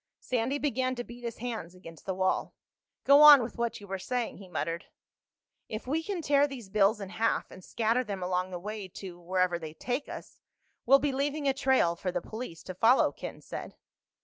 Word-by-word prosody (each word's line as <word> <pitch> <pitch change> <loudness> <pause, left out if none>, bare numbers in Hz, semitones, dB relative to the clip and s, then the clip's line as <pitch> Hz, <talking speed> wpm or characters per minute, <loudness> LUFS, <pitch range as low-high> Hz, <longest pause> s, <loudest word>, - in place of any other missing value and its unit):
Sandy 255 +3 -1
began 260 -3 0
to 245 - -4
beat 240 +1 -12
his 235 -1 -4
hands 220 -7 -5
against 165 -3 -13
the 190 - -1
wall. 185 0 0 0.5
"Go 280 +1 +7
on 295 -4 +10
with 235 - -7
what 235 -1 -1
you 205 - -11
were 195 -1 -4
saying," 245 +4 -2
he 195 - -12
muttered. 165 0 -3 0.8
"If 215 +1 -5
we 300 +6 0
can 355 -1 -4
tear 285 -1 +4
these 250 -8 -9
bills 210 +1 +3
in 195 -2 -6
half 225 +3 0
and 185 - -12
scatter 230 +5 0
them 200 -5 -5
along 180 0 -1
the 180 - -5
way 205 +2 -6
to—wherever 180 -1 -2
they 160 -1 -8
take 250 - -3
us—we'll 270 +3 -1
be 280 +1 0
leaving 285 +2 -1
a 270 - +3
trail 265 -11 +2
for 180 +1 -3
the 180 - -1
police 215 -2 -8
to 185 - -6
follow," 225 +8 +4
Ken - - -8
said. - - -7
225 Hz, 200 wpm, -29 LUFS, 185-260 Hz, 0.8 s, on